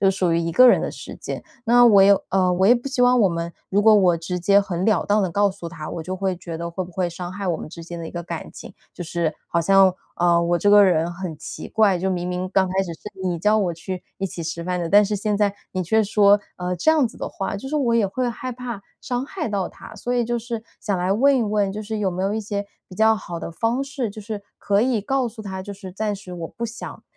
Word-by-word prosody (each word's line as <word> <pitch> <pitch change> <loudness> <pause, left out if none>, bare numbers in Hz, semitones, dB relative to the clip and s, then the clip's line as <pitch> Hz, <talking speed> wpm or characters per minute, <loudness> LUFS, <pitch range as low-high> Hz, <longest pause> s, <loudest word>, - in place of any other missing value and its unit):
就 195 - +4
属 185 -3 0
于 165 - +2
一 170 0 -2
个 255 +8 +8
人 - - +5
的 - - -2
时 - - -9
间。 - - -6 0.2
那 240 +1 +6
我 210 -4 +7
也 200 +1 +7 0.2
呃， 185 -1 +2
我 185 +2 +2
也 - - +8
不 240 +2 -4
希 265 -2 0
望 250 0 +5
我 195 - +5
们 170 0 -3 0.2
如 205 +2 +2
果 220 0 +7
我 185 -4 +4
直 175 +2 -4
接 200 +3 +4
很 185 -2 -3
了 215 -6 +2
当 210 +1 +2
地 190 - +1
告 200 +3 +2
诉 190 -3 -8
他， 155 -3 -7
我 - - -5
就 185 +3 -4
会 190 -1 -1
觉 170 -2 -7
得 170 +1 -5
会 185 +2 -4
不 175 - -13
会 180 -1 -1
伤 175 +1 -6
害 200 +1 -6
我 165 - +1
们 - - -8
之 165 +1 -10
间 170 0 -8
的 165 - -6
一 - - -8
个 175 - -4
感 170 -1 -6
情。 - - -11 0.2
就 - - -6
是 170 -2 -2
好 170 - +1
像， 195 +1 +5 0.2
啊， 170 -1 +3
我 170 0 +1
这 205 +4 +3
个 205 -1 +8
人 170 -2 +2
很 175 -3 -6
奇 - - -8
怪， 205 -5 +3
就 190 - -1
明 180 -1 -2
明 180 +1 -3
刚 190 -1 +3
开 190 - -2
始 170 -3 -5
是 - - -20 0.2
你 180 -2 0
叫 210 +3 +3
我 180 -5 0
去 180 +2 -6 0.2
一 195 - -2
起 170 -2 -7
吃 170 +1 -4
饭 180 +1 -2
的， 170 -1 -2
但 205 +2 +6
是 210 +1 -1
现 210 +1 -1
在 205 -1 +2 0.2
你 185 -1 -1
却 220 +6 +2
说， 205 -1 +4 0.2
呃， 180 0 -2
这 315 - +3
样 300 -6 +3
子 - - -15
的 - - -4
话， 195 0 -4
就 265 +7 -7
是 305 - -4
我 255 -5 +1
也 225 -4 +3
会 250 +6 -2
害 255 +2 -6
怕 240 -3 -6 0.2
伤 250 0 -2
害 355 -9 -4
到 195 -3 -1
他。 - - -13
所 245 - -2
以 240 -1 +2
就 240 +1 -1
是 230 -1 -5 0.2
想 205 -3 -1
来 180 +1 0
问 275 +7 +4
一 - - +1
问， 205 -2 0
就 215 +1 -5
是 215 +1 -4
有 195 -3 0
没 180 +2 -3
有 195 +2 0
一 220 - -1
些 205 -1 -4 0.2
比 185 - -11
较 220 +2 +4
好 175 -5 -6
的 - - -5
方 230 +9 -1
式， 275 -4 -3
就 215 - -9
是 210 -1 -6 0.2
可 200 0 +1
以 240 -2 +1
告 265 +3 0
诉 220 0 -10
他， 190 -2 -5
就 200 +1 -7
是 195 -1 -9
暂 210 +2 -2
时 185 -2 -11
我 170 -2 -5
不 235 - -6
想， 230 +1 -7
195 Hz, 305 characters per minute, -22 LUFS, 175-220 Hz, 0.2 s, 个